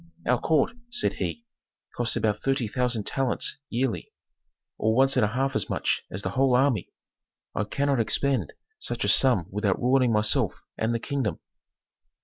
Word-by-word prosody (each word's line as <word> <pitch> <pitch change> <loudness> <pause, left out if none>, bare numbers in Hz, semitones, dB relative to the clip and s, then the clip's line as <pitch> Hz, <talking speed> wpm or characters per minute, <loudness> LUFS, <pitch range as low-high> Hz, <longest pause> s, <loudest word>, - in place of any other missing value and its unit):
"Our 125 0 +2
court," 160 - +2
said 240 0 0
he, 235 - -4 0.5
"costs 120 -1 0
about 105 -1 0
thirty 135 -3 0
thousand 125 -1 0
talents 135 0 -1
yearly, 125 0 -2 0.7
or 110 +1 +2
once 135 +2 +4
and - - +3
a - - +4
half 135 +5 -1
as 110 - 0
much - - 0
as 95 +2 -5
the - - -2
whole 130 -1 +3
army. 125 -6 +2 0.6
I 105 - -1
cannot 140 +4 0
expend 115 - +1 0.3
such - - -2
a - - 0
sum 125 -11 +5
without 100 -1 0
ruining 125 0 +3
myself 105 -1 +2 0.2
and 110 +1 -1
the - - -1
kingdom." 120 - -2
125 Hz, 160 wpm, -26 LUFS, 110-135 Hz, 0.7 s, sum